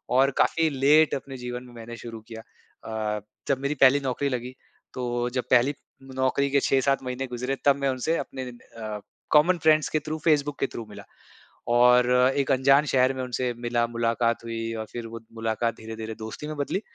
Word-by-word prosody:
और 135 +2 +5
काफ़ी 165 -1 +3
लेट 145 +3 +4
अपने 135 0 -7
जीवन 125 0 -6
में 125 - -14
मैंने 115 0 -9
शुरू 115 -1 -8
किया। 110 -1 -8 0.8
अ, - - -7 0.3
जब 135 -2 +1
मेरी 140 +2 -1
पहली 135 +2 +7
नौकरी 135 +1 -1
लगी 125 0 -4 0.4
तो 120 -1 -2
जब 125 -1 -1
पहली 130 +3 +5 0.4
नौकरी 130 +2 +1
के 140 - +4
6-7 135 0 +1
महीने 130 +1 -4
गुज़रे 125 +2 -3
तब 140 -1 +6
मैं 140 -1 +1
उनसे 130 +6 0
अपने 130 -1 -5
इन 120 - -12 0.2
अ, 110 -2 -5 0.3
कॉमन 165 +4 +5
फ्रेंड्स 155 -1 +3
के 155 - 0
थ्रू 155 +1 -3
फेसबुक 145 -3 +2
के 135 - +1
थ्रू 115 - -7
मिला 105 - -10 0.7
और 125 0 +5 0.3
एक 140 -2 +1
अनजान 135 +3 +4
शहर 130 -1 +3
में 130 - -4
उनसे 125 0 -2
मिला, 120 0 -1
मुलाकात 115 0 0
हुई 115 0 -4
और 110 0 -4
फिर 120 -1 -6
वो 115 0 -8
मुलाकात 115 0 -1
धीरे-धीरे 110 0 -7
दोस्ती 110 +7 -7
में 155 - -5
बदली 145 +8 -1
125 Hz, 190 wpm, -26 LUFS, 120-140 Hz, 0.8 s, पहली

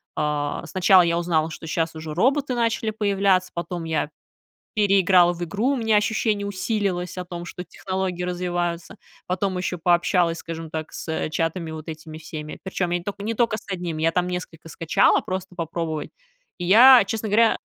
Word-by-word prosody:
А, 150 -1 -2
сначала 185 0 +5
я 170 0 +1
узнала, 165 -2 +1
что 160 - -8
щас 160 0 -1
уже 155 -1 -6
роботы 265 - +1
начали 230 -2 0
появляться, 195 -3 +1
потом 170 0 -4
я 160 -2 -1 0.7
переиграла 190 -4 +4
в 175 0 -7
игру, 205 +9 -1
у 280 - +1
меня 225 -3 +2
ощущение 210 -1 0
усилилось 195 -3 -2
о 180 - -4
том, 175 -1 -7
что 180 - -7
технологии 185 -1 -4
развиваются. 175 -1 -3 0.3
Потом 185 +1 -1
ещё 180 -1 -2
пообщалась, 175 0 +2
скажем 165 -1 -7
так, 155 0 -6
с 160 -1 -3
чатами 165 +1 -2
вот 160 +1 -8
этими 155 0 -8
всеми, 155 -1 -8
причём 185 -2 -2
я 175 - +1
не 175 - -12
только 205 0 -5
я 205 - -5
не 230 - -1
только 230 -1 +1
с - - -11
1, 175 -3 -4
я 165 +1 +2
там 180 0 +1
несколько 180 -3 -6
скачала 165 +1 +3
просто 185 0 -5
попробовать, 165 -2 -3 0.5
и 175 - -4
я, 240 +4 +8
честно 220 +1 -3
говоря 225 +2 +4
180 Hz, 180 wpm, -23 LUFS, 165-200 Hz, 0.7 s, я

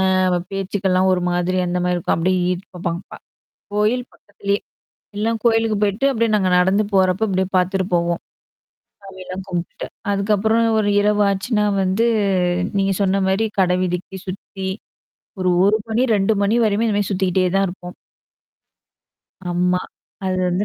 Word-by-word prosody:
அ - - +2 0.5
பேச்சுக்கலாம் 190 -1 0
ஒரு 180 - +1
மாதிரி 180 +1 0
அந்த 175 +1 -1
மாரி 180 - +1
இருக்கும். 175 - 0
அப்படியே 185 +3 +1
ஈ 180 - +2 0.2
போப்பாங்க. 175 0 -3 0.7
கோயில் 215 +4 +1
பக்கத்திலேயே. 200 0 -3 0.6
எல்லாம் 225 +1 0
கோயிலுக்கு 225 -2 +2
போய்ட்டு 210 +5 +1
அப்படியே 230 -3 +1
நாங்க 190 -3 +1
நடந்து 190 +4 +3
போறப்ப 190 +2 +3
அப்படியே 190 -1 0
பார்த்துட்டு 185 +1 +1
போவோம். 170 0 0 0.8
சாமிலாம் 190 -1 -8
கும்பிட்டுட்டு. 175 -1 -4 0.3
அதுக்கப்புறம் 215 +3 +2
ஒரு 210 - +1
இரவ 210 0 +2
ஆச்சுன்னா 210 +2 0 0.2
வந்து 190 +5 +1 0.7
நீங்க 195 0 +2
சொன்ன 195 0 +1
மாரி 195 +4 +1
கடை 180 -1 +3
வீதிக்கி 185 +1 -3
சுத்தி. 190 0 -6 0.7
ஒரு 185 - +2
1 205 +2 +4
மணி, 225 +2 +1
2 200 +2 +2
மணி 200 +3 +2
வரையுமே 215 +1 +1
இந்த 210 -2 0
மாரி 205 - -1
சுத்திக்கிட்டே 185 -1 +1
தான் 195 - +3
இருப்போம். 180 0 -9 1.5
ஆம்மா. 180 +1 +1 0.5
அது 185 0 0
வந்து 180 +3 0
195 Hz, 140 wpm, -20 LUFS, 185-210 Hz, 1.5 s, 1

